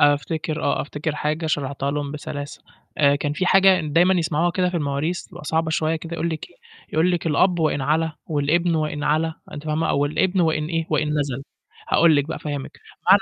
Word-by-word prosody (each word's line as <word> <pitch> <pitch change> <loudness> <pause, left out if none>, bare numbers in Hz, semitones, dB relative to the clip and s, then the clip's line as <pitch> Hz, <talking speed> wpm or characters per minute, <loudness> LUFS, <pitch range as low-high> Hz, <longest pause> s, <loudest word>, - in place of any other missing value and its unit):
أفتكر 150 +2 +1
آه، - - +1
أفتكر 150 +1 -3
حاجة 155 +2 -2
شرحتها 140 -2 -1
لهم 145 -1 -3
بسلاسة، 145 -1 -6 0.4
آآ، 140 -1 +5
كان 145 +1 -2
في 180 +5 -1
حاجة 190 0 +6
ن 150 -2 -5
دايمًا 180 +3 +5
يسمعوها 165 0 +1
كده 180 +1 +1
في 180 - -2
المواريث 150 +3 -2
بتبقى - - -12
صعبة 160 +1 0
شويّة 160 0 +1
كده 165 +1 -9
يقول 170 0 -1
لك 160 - -6
إيه، - - -23 0.4
يقول 165 +3 +3
لك: 175 -1 -1
"الأب 175 +4 +3
وإن 155 -3 +1
علا 155 +3 +1
والابن 160 +3 +1
وإن 155 -2 -1
علا." 155 +2 +1 0.2
أنتِ 145 0 -7
فاهمة؟ 155 +1 0
أو 140 - +2
الابن 185 +5 +1
وإن 160 -2 +1
إيه، 165 0 -2
وإن 150 -1 +1
نَزَل. 135 -1 -3 0.5
هاقول 165 -2 +5
لك 145 - +2
بقى 160 - -3
أفهّمك، 145 -3 -5 0.4
معنى 195 +1 +8
155 Hz, 205 wpm, -22 LUFS, 145-165 Hz, 0.5 s, معنى